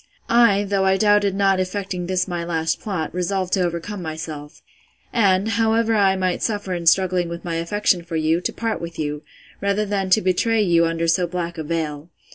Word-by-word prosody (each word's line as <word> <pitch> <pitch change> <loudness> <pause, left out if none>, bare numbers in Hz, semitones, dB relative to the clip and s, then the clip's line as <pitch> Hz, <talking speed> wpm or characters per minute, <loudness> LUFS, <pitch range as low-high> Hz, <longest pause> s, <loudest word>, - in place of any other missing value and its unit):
I, 230 -4 +5
though 200 -1 0
I 190 0 +3
doubted 205 -1 +3
not 195 -1 +2
effecting 185 -1 -3
this 185 0 0
my 175 -2 -3
last 160 -1 -1
plot, 180 -7 -4
resolved 185 +1 -2
to 190 - +2
overcome 175 +3 -3
myself; 155 -2 -7 0.5
and, 200 -3 +3
however 225 0 +1
I 195 -3 +3
might 185 -1 -1
suffer 205 -4 -2
in 170 -1 -4
struggling 180 0 +3
with 170 +1 -7
my 165 -1 -2
affection 180 +2 +1
for 170 0 -7
you, 160 +2 +1
to - - -2
part 225 -1 -3
with 170 -1 -7
you, 150 -1 -3 0.4
rather 200 +1 0
than 195 -2 -2
to 200 - +5
betray 215 +4 +2
you 170 -3 +3
under 165 0 -1
so 175 +2 +2
black 170 -1 -4
a - - -3
veil. 155 -1 -3
185 Hz, 195 wpm, -21 LUFS, 170-200 Hz, 0.5 s, I